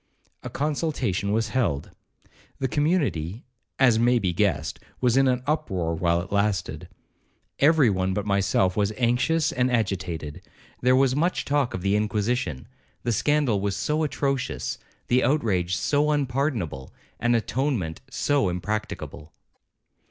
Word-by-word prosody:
A - - -6
consultation 135 - -1
was 110 +1 0
held. 110 - -1 0.7
The 130 - -1
community, 130 - 0 0.3
as 125 -4 +4
may 120 +1 +4
be 95 -6 0
guessed, 100 +2 0 0.2
was 125 -2 +2
in 135 0 +4
an 125 -1 +1
uproar 95 - -1
while 85 +1 +1
it 90 - -9
lasted. 100 -2 -1 0.7
Every 145 -5 +5
one 95 0 0
but 105 - -2
myself 95 -2 +2
was 105 0 +1
anxious 130 +7 +2
and 125 0 +1
agitated. 90 -10 -2 0.4
There 125 +1 +4
was 130 -1 +3
much 170 +5 0
talk 145 -3 0
of 90 - -5
the 100 +1 +2
inquisition,—the 105 - -2
scandal 135 -3 +1
was 100 -1 -1
so 150 +1 -1
atrocious,—the 135 -3 -2
outrage 95 - +1
so 145 +9 +1
unpardonable,—and 125 - -2
atonement 115 - -1
so 140 -7 +1
impracticable. 90 -4 -4
115 Hz, 125 wpm, -25 LUFS, 95-135 Hz, 0.7 s, Every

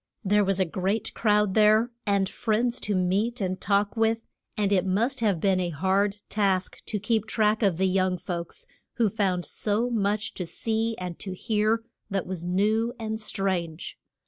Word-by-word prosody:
There 205 +2 +4
was 195 -1 0
a 190 - +3
great 190 +5 -2
crowd 210 -3 +2
there, 215 +3 +4 0.2
and 200 -1 +2
friends 235 +5 0
to 205 - -1
meet 200 +7 +1
and 185 -2 -2
talk 200 +2 +1
with, 225 0 +1 0.3
and 205 -2 +1
it 190 -3 +3
must 230 +9 0
have 205 -7 +1
been 190 +1 +2
a 180 -1 -1
hard 190 +5 +1
task 195 -3 0
to 210 - -1
keep 220 +1 0
track 215 0 +2
of 195 -6 +2
the 190 - +2
young 185 -1 +1
folks, 175 - -5 0.3
who 225 -5 +1
found 185 -4 0
so 220 +4 -1
much 210 0 0
to 180 - -5
see 225 +5 -1
and 180 -2 -6
to 190 -2 -5
hear 215 +3 +1 0.3
that 195 -2 -1
was 180 -2 -4
new 215 +6 +1
and 220 -1 -4
strange. 185 -5 -2
205 Hz, 175 wpm, -26 LUFS, 185-220 Hz, 0.3 s, There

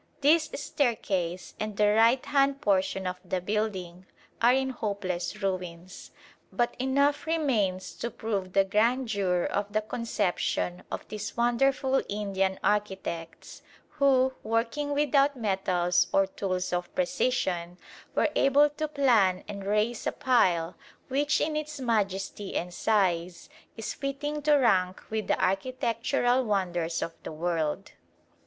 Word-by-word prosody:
This 305 +2 +4
staircase 195 - -1
and 215 -1 -4
the 210 -1 +4
right 230 +4 +4
hand 275 -1 +2
portion 195 -5 +1
of 180 0 -3
the 185 0 -2
building 190 -3 -3 0.3
are 235 +1 +6
in 265 +1 +1
hopeless 200 -4 -3
ruins, 180 -1 -4 0.4
but 240 -1 0
enough 280 +4 +1
remains 230 - 0
to 235 - -3
prove 200 -5 -3
the 195 - +5
grandeur 210 -4 +1
of 205 0 -2
the 215 +1 +1
conception 205 -5 -2
of - - -6
these 215 +1 -6
wonderful 260 +3 +2
Indian 195 -2 -1
architects 190 -5 -3 0.3
who, 265 -3 +3
working 230 +6 -1
without 285 -1 +3
metals 185 -5 +1
or 195 - +4
tools 185 -2 -3
of 175 0 -3
precision, 245 -10 -1 0.4
were - - +3
able 285 +2 +4
to 310 +1 -3
plan 235 -11 +3
and 200 -1 -6
raise 215 +3 0
a - - +1
pile 180 -10 +2 0.3
which 290 +3 +1
in 310 0 0
its 305 -1 -4
majesty 205 -4 -1
and 175 +1 -2
size 180 -4 0 0.3
is 225 - -4
fitting 290 +2 -3
to 295 0 +4
rank 190 -9 +2
with 220 -2 -2
the - - +1
architectural 245 +4 +1
wonders 175 -6 -1
of 165 - -5
the - - -7
world. 165 +2 -2
210 Hz, 130 wpm, -28 LUFS, 185-265 Hz, 0.4 s, are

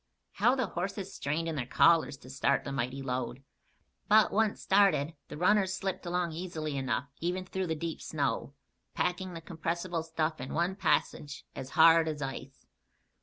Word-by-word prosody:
How 240 +6 +3
the 255 -2 0
horses 195 +1 -4
strained 155 +4 -2
in 165 - -1
their 125 -4 -3
collars 165 -1 +4
to 130 - -14
start 135 - +1
the 140 - -5
mighty 135 0 -2
load! 125 0 -3 0.6
But 215 +1 +6
once 215 0 +1
started, 190 -6 +3
the - - -8
runners 190 +2 +3
slipped 190 -1 -4
along 175 -1 0
easily 160 -3 -4
enough, 135 +1 -1
even 180 +2 -2
through 190 0 -3
the 160 - -1
deep 165 +1 -4
snow, 140 -1 -2 0.4
packing 180 0 -1
the 165 - -6
compressible 170 +1 -3
stuff 160 -1 -2
in 130 - -5
one 175 +3 +1
passage 145 -7 0
as 130 - -6
hard 165 0 +7
as 155 -2 -3
ice. 135 -1 -6
165 Hz, 170 wpm, -30 LUFS, 140-185 Hz, 0.6 s, hard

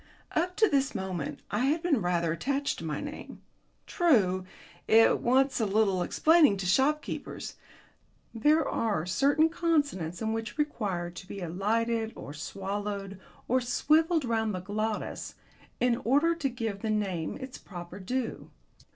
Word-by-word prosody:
Up 360 +3 0
to 435 - +4
this 275 - +1
moment 185 -6 -4
I 210 +6 +1
had 315 +4 +1
been 300 -10 +2
rather 170 -2 +1
attached 280 +10 -1
to - - -8
my 155 -2 -3
name. 290 +1 -8 0.4
True, 195 - +2 0.4
it 225 +1 +5
wants 265 +2 +2
a 220 - +1
little 195 -2 +2
explaining 310 - +4
to 190 - -4
shopkeepers. 270 +11 0 0.8
There 300 +7 +3
are 205 -8 0
certain 285 - +3
consonants 290 - 0
in 220 - -2
it - - 0
which 225 +3 -4
require 200 - -2
to 185 +2 -10
be 200 - -7
elided 220 +6 -1
or 145 - -8
swallowed 195 +3 -5 0.3
or 255 +1 +2
swivelled 310 +5 +2
round 220 -3 0
the 185 - -4
glottis, 215 +3 -3 0.4
in 245 -1 +2
order 290 +9 +3
to 325 -5 -1
give 225 -5 -4
the 220 - -2
name 195 -7 -1
its 260 -1 -8
proper 175 0 -9
due. 245 +5 -3
225 Hz, 150 wpm, -29 LUFS, 190-280 Hz, 0.8 s, it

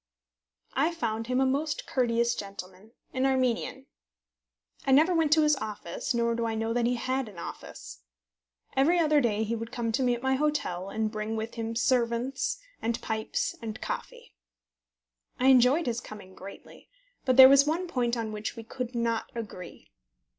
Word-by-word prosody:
I 335 +3 +1
found 225 -5 -2
him 250 +1 +1
a 265 - +3
most 285 +4 -1
courteous 235 -2 +1
gentleman, 195 0 -9 0.2
an 260 +1 +1
Armenian. 255 -3 0 1.0
I 270 - 0
never 310 +7 +5
went 325 -3 +2
to 315 0 +4
his 300 0 +4
office, 215 0 -4
nor 235 0 +1
do 235 0 -2
I 225 - -2
know 225 +1 -1
that 240 0 +1
he 245 - +1
had 255 0 -2
an 195 - -14
office. 170 - -9 0.8
Every 300 +7 +4
other 305 -3 +4
day 220 -3 +1
he 225 +2 -2
would 230 +1 -6
come 235 -2 -2
to 255 +4 0
me 245 -1 +2
at 240 - -9
my 265 0 +2
hotel, 265 -11 -1
and 215 +1 -2
bring 215 0 -3
with 220 +1 -4
him 230 0 -4
servants, 245 - 0 0.2
and 230 +1 -1
pipes, 220 0 -2
and 220 -2 -6
coffee. - - -6 1.1
I 260 - +4
enjoyed 265 +5 +5
his 235 -1 -2
coming 200 -3 -11
greatly; 195 +1 -12 0.3
but 255 -1 +1
there 260 -1 +12
was 275 +1 +6
one 335 +4 0
point 245 -7 -1
on 225 -2 -3
which 215 +2 -5
we 230 - -8
could 250 +2 -6
not 230 -1 -1
agree. 210 -6 -8
235 Hz, 175 wpm, -28 LUFS, 220-265 Hz, 1.1 s, there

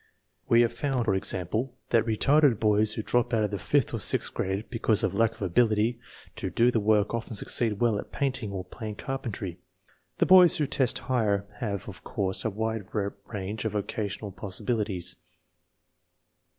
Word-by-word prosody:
We 115 0 +6
have 120 0 +2
found, 130 -1 -1
for 100 - +2
example, 95 +7 -2
that 115 -1 +2
retarded 135 +2 +3
boys 105 0 +2
who 110 - -4
drop 120 +1 +1
out 110 - +2
of 105 - -1
the 100 - -3
fifth - - +1
or - - -2
sixth - - +2
grade 95 +3 -2
because 115 -3 +1
of - - +1
lack 115 -1 +2
of 110 - -7
ability 110 +4 +2 0.4
to 105 -4 -3
do 115 +7 +3
the 115 - +1
work 105 0 +2
often 115 -1 -3
succeed 105 0 +1
well 115 -4 +2
at - - -8
painting 130 -6 -2
or 95 -2 -5
plain 105 +3 -7
carpentry. 105 -10 -5 0.6
The - - +3
boys 180 -2 +7
who 150 - +1
test 130 -3 0
higher 105 -6 +1
have, 100 -6 -3
of 95 -3 -10
course, 95 -2 0
a 110 - 0
wider 105 -1 -3
range 105 0 -5
of 110 -2 -2
vocational 105 0 -3
possibilities. 95 -1 -2
110 Hz, 175 wpm, -27 LUFS, 100-120 Hz, 0.6 s, boys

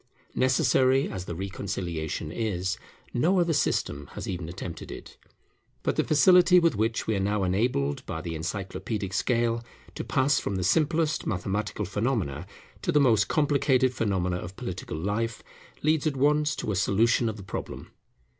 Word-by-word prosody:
Necessary 130 +1 +3
as 95 -2 -5
the 85 - -5
reconciliation 90 -4 -4
is, 95 -2 -2 0.3
no 175 +10 +3
other 170 -1 +2
system 75 - 0
has - - -6
even 85 -3 -4
attempted 85 -1 -7
it. - - -9 0.7
But - - 0
the - - +2
facility 180 +4 +6
with 170 -5 +2
which 110 +2 0
we 110 - 0
are - - 0
now 100 +1 0
enabled, 90 - 0
by 80 - -3
the 85 0 -5
encyclopædic 95 +4 -4
scale, 115 +2 +1 0.3
to - - -5
pass 140 +2 +2
from 100 - -3
the 95 - -1
simplest 155 - +1
mathematical 100 +1 -2
phenomena 95 - -2 0.3
to - - 0
the 150 - +4
most 115 -7 +4
complicated 140 -4 +2
phenomena 95 -6 0
of 90 +1 -7
political 90 -5 -5
life, 105 +7 -2 0.4
leads 155 0 +2
at 140 -3 -1
once 150 +2 +2
to - - -3
a - - -1
solution 110 +4 +2
of 110 - -5
the 100 - -9
problem. 95 - -6
105 Hz, 160 wpm, -27 LUFS, 95-135 Hz, 0.7 s, facility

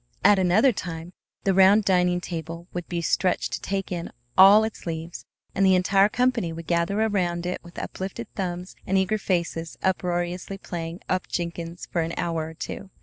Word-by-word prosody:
At 205 -2 +6
another 190 +8 +4
time 175 -4 -6 0.3
the 195 - +2
round 195 +3 +6
dining 180 -1 +2
table 170 0 -6
would 175 -1 -4
be 170 -1 -2
stretched 180 +2 +1
to - - -3
take 195 -1 -3
in 170 -2 -4 0.2
all 200 +3 +8
its 220 -4 -5
leaves, 165 +1 -5 0.3
and 195 - +1
the 190 -1 +6
entire 195 +2 +4
company 250 -8 +1
would 165 0 -7
gather 170 +5 0
around 180 -6 0
it 180 - -3
with 170 0 -14
uplifted 195 +5 -5
thumbs 180 -1 -4
and 195 - +2
eager 190 +3 +1
faces 170 -3 -2
unroariously 180 0 -1
playing 170 -2 -6
"up 185 0 -1
Jenkins" 170 0 -4
for 170 - +1
an 165 +1 -3
hour 165 -2 -1
or 160 - -10
two. 195 +3 -6
180 Hz, 180 wpm, -25 LUFS, 170-195 Hz, 0.3 s, all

